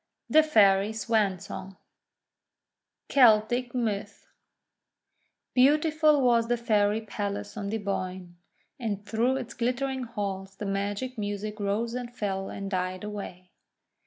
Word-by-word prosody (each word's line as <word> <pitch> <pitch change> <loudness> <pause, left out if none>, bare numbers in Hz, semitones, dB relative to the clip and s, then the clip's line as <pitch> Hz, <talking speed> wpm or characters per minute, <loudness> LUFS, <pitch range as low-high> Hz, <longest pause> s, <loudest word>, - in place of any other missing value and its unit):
THE 310 - +8
FAIRY 205 -8 +4
SWAN 215 -3 +1
SONG 190 0 -8 1.3
Celtic 240 0 +4
Myth 220 -5 -3 1.3
BEAUTIFUL 300 +2 +4
was 235 -2 +3
the 240 0 +1
Fairy 215 -2 +2
Palace 205 -1 -4
on 200 -2 -4
the 220 - -1
Boyne, 185 -3 -4 0.4
and 205 -4 -3
through 230 +5 +1
its 245 -3 -6
glittering 255 +2 -1
halls 195 -4 -5
the 210 - -6
magic 205 +5 -3
music 210 +1 -4
rose 210 +3 -1
and 245 -1 -5
fell 195 -5 -3
and 195 0 -6
died 185 0 -2
away. 195 -3 -7
215 Hz, 120 wpm, -27 LUFS, 200-240 Hz, 1.3 s, THE